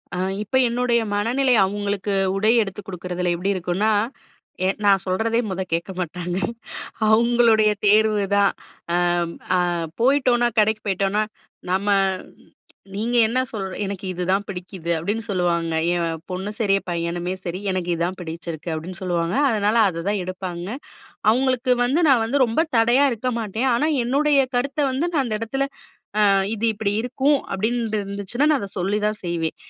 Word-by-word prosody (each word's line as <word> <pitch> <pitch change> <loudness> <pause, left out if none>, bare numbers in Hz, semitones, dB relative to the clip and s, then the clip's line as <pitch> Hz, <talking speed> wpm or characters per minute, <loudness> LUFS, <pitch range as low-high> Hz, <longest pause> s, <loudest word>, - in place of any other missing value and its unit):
அ - - -3 0.3
இப்ப 215 - -4
என்னுடைய 240 0 +1
மனநிலை 245 +5 +2
அவுங்களுக்கு 200 0 -2 0.2
உடை 215 +3 +3
எடுத்து 205 0 -4
குடுக்குறதில 180 -1 -2
எப்படி 190 +4 -1
இருக்கும்ன்னா, 185 +4 0 0.8
எ - - +3 0.2
நான் 195 -2 +4
சொல்றதே 225 +5 +1
மொத 190 0 -3
கேட்க 170 +3 -1
மாட்டாங்க. 180 +1 -3 0.7
அவங்களுடைய 230 -1 +4 0.2
தேர்வுதான். 205 -1 +3 0.4
அம் 175 -1 +1 0.2
அ - - +2 0.4
போயிட்டோம்ன்னா 250 -2 +3
கடைக்கு 215 +1 +2
போயிட்டோம்ன்னா, 195 +2 +1 0.5
நம்ம 195 +2 0 1.1
"நீங்க 230 +4 -2
என்ன 240 +3 0
சொல் 205 -4 -4 0.2
எனக்கு 195 -1 -5
இதுதான் 185 +3 0
பிடிக்குது." 180 -2 -5
அப்படீன்னு 205 +8 -2
சொல்லுவாங்க. 170 -3 0 0.2
என் 165 -2 -1
பொண்ணும் 190 +3 -4
சரி, 200 -4 +3
பையனுமே 175 +1 -2
சரி, 175 +1 -3
"எனக்கு 185 -2 -2
இதான் 175 +3 -2
பிடிச்சிருக்கு." 165 0 -6
அப்படீன்னு 170 +4 -6
சொல்லுவாங்க. 175 -1 -1
அதனால, 210 -1 +1
அத 165 -2 -5
தான் 205 -2 0
எடுப்பாங்க. 180 -1 -5 0.6
அவங்களுக்கு 255 0 +2
வந்து 280 +8 +1
நான் 255 -5 +5
வந்து 265 +4 +2
ரொம்ப 230 +8 +1
தடையா 240 +5 +4
இருக்க 250 +3 -2
மாட்டேன். 225 +4 -1
ஆனா 295 +6 +1 0.2
என்னுடைய 280 +3 +3 0.2
கருத்தை 280 +4 0
வந்து 265 +6 0
நான் 280 -4 +1
அந்த 215 -3 -2
இடத்துல, 270 +5 -1 0.6
"அ - - +5 0.3
இது 225 +1 -1
இப்படி 205 -1 -1
இருக்கும்." 270 +4 +2
அப்படீன்டு 220 +1 -1
இருந்துச்சுன்னா, 200 +8 -1
நா 295 - +2
அதை 200 - -6
சொல்லிதான் 210 +3 -1
செய்வேன். 165 -2 -2
205 Hz, 145 wpm, -22 LUFS, 180-235 Hz, 1.1 s, நான்